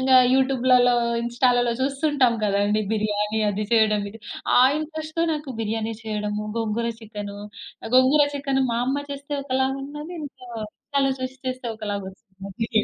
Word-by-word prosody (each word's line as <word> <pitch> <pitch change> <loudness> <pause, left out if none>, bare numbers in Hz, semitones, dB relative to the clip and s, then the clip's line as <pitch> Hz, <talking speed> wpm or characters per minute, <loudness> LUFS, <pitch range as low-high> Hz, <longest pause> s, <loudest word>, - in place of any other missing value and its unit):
ఇంగ 265 0 0 0.2
యూట్యూబులలో, 255 -2 +4 0.3
ఇన్‌స్టాలలో 245 0 +2
చూస్తుంటాం 275 -2 +2
కదండీ, 205 +1 +2
బిర్యానీ 210 0 0
అది 210 +1 -2
చెయడం 215 -2 +4
ఇది. 225 - -12 0.4
ఆ - - +8 0.2
ఇంట్రస్ట్‌తో 315 +1 -3
నాకు 300 -2 -4
బిర్యానీ 220 +1 -2
చెయ్యడము, 210 -1 -3
గోంగూర 225 +1 -1
చికెనూ 205 -2 -7 0.5
ఆహ్, 225 - -5
గోంగూర 275 +3 +6
చికెన్ 275 -1 0
మా 230 - 0
అమ్మ 285 +2 -1
చేస్తే 280 +1 -7
ఒకలాగున్నది, 275 +4 -2
ఇందులో 260 -4 -9 0.2
ఇన్‌స్టాలో 275 +3 -1
చూషి 255 +1 -5
చేస్తే 255 -1 -4
ఒకలాగొస్తుందది. 200 +1 -6
245 Hz, 130 wpm, -24 LUFS, 215-270 Hz, 0.5 s, ఆ